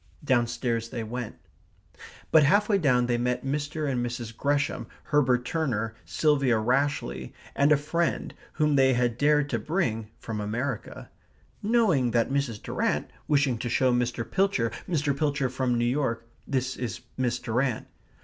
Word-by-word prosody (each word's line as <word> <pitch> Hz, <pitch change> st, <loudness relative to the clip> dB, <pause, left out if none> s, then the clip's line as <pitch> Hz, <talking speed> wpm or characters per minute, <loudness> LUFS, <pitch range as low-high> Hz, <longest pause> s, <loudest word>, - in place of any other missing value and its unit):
Downstairs 120 Hz, -3 st, 0 dB
they 115 Hz, -1 st, -4 dB
went. 120 Hz, 0 st, -5 dB, 1.0 s
But 160 Hz, -, +7 dB
half 200 Hz, +9 st, +4 dB
way 200 Hz, -2 st, +3 dB
down 125 Hz, -7 st, +3 dB
they 120 Hz, -1 st, 0 dB
met 125 Hz, +1 st, -1 dB
Mr. 145 Hz, +2 st, -2 dB
and 125 Hz, -3 st, 0 dB
Mrs. 120 Hz, -2 st, -5 dB
Gresham, 145 Hz, +2 st, 0 dB, 0.2 s
Herbert 130 Hz, -4 st, +2 dB
Turner, 120 Hz, -9 st, -1 dB
Sylvia 135 Hz, -, +2 dB
Rashleigh, 125 Hz, -, 0 dB, 0.3 s
and 140 Hz, +2 st, +3 dB
a 150 Hz, -, +6 dB
friend, 165 Hz, +4 st, -1 dB, 0.2 s
whom 150 Hz, -2 st, +2 dB
they 130 Hz, -1 st, +5 dB
had 120 Hz, -1 st, +1 dB
dared 150 Hz, +2 st, +3 dB
to -, -, 0 dB
bring, 115 Hz, -, -1 dB
from 110 Hz, -2 st, -5 dB
America, 115 Hz, +3 st, -4 dB, 0.5 s
"knowing 205 Hz, -, +3 dB
that 115 Hz, +2 st, +1 dB
Mrs. 135 Hz, -6 st, -1 dB
Durrant -, -, -1 dB, 0.2 s
wishing 140 Hz, -5 st, +2 dB
to 120 Hz, -, -3 dB
show 130 Hz, +1 st, +3 dB
Mr. 120 Hz, -1 st, -1 dB
Pilcher. 190 Hz, -, +1 dB, 0.2 s
Mr. 150 Hz, -5 st, +1 dB
Pilcher 140 Hz, -2 st, 0 dB
from 130 Hz, -2 st, 0 dB
New 120 Hz, -, +1 dB
York 120 Hz, -3 st, -1 dB, 0.2 s
This 130 Hz, -2 st, -1 dB
is 120 Hz, -1 st, -4 dB
Miss 125 Hz, -2 st, 0 dB
Durrant." 120 Hz, +1 st, -1 dB
130 Hz, 150 wpm, -27 LUFS, 120-145 Hz, 1.0 s, But